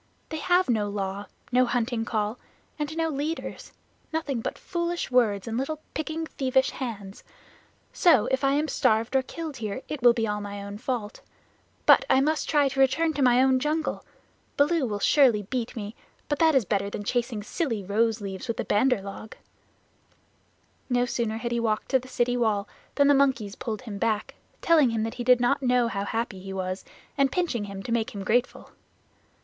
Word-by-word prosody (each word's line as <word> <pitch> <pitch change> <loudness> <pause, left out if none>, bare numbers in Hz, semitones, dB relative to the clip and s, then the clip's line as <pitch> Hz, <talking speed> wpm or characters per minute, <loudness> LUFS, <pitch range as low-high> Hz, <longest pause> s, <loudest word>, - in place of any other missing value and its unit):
"They 315 - -4
have 355 +4 +3
no 215 -4 +1
Law, 200 0 -4 0.2
no 250 0 +4
Hunting 235 -1 -1
Call, 215 +1 -2 0.4
and 300 +2 -3
no 325 0 +1
leaders 305 +3 -4 0.4
nothing 295 -7 -2
but - - -4
foolish 345 -3 -3
words 220 -5 +2
and 225 +1 -2
little 300 +3 -3
picking 315 +1 -3
thievish 265 -3 +1
hands. 205 -6 -6 0.7
So 315 - +5
if 265 +1 0
I 275 0 +3
am 300 +2 +1
starved 230 -3 +1
or 265 - +5
killed 310 +1 -7
here, 215 +2 -4
it 300 -4 -5
will 240 -1 +7
be 230 -2 -1
all 210 -1 -2
my 200 0 -6
own 200 +1 -7
fault. 235 -4 -4 0.6
But - - +7
I - - +5
must 305 +3 0
try 290 -2 +4
to 270 - -5
return 315 +5 +3
to 285 - -2
my 250 0 +5
own 260 -1 +3
jungle. 310 +3 -1 0.5
Baloo 295 -1 +3
will 205 -2 -2
surely 230 0 +4
beat 240 +3 -4
me, 210 -2 -5 0.3
but 290 - -1
that 320 -2 +4
is 260 -6 +3
better 200 +1 0
than 205 - -5
chasing 235 -1 -1
silly 240 - -2
rose 220 +3 +1
leaves 195 +3 -6
with 230 - -2
the - - -2
Bandar 220 -1 +2
log." 200 +2 -8 1.5
No 245 0 +2
sooner 230 -2 -2
had 235 +1 -4
he 240 - 0
walked 220 -2 -1
to 265 - +3
the 255 - -13
city 245 -1 0
wall 215 -4 +1 0.3
than 285 -1 +4
the 285 - +6
monkeys 260 -7 +2
pulled 220 0 -5
him 210 -5 -7
back, 215 -1 -1 0.3
telling 315 -6 +5
him 225 -1 -1
that 225 - -3
he - - -1
did 250 0 +5
not 245 +4 +2
know 250 -2 +3
how 200 -3 -3
happy 225 -2 -3
he 195 +1 -7
was, 185 0 -3 0.4
and 275 -1 +3
pinching 330 - -1
him 195 -1 -7
to 230 - -5
make 235 +1 -1
him 200 - -4
grateful. 240 +5 0
245 Hz, 195 wpm, -26 LUFS, 210-275 Hz, 1.5 s, will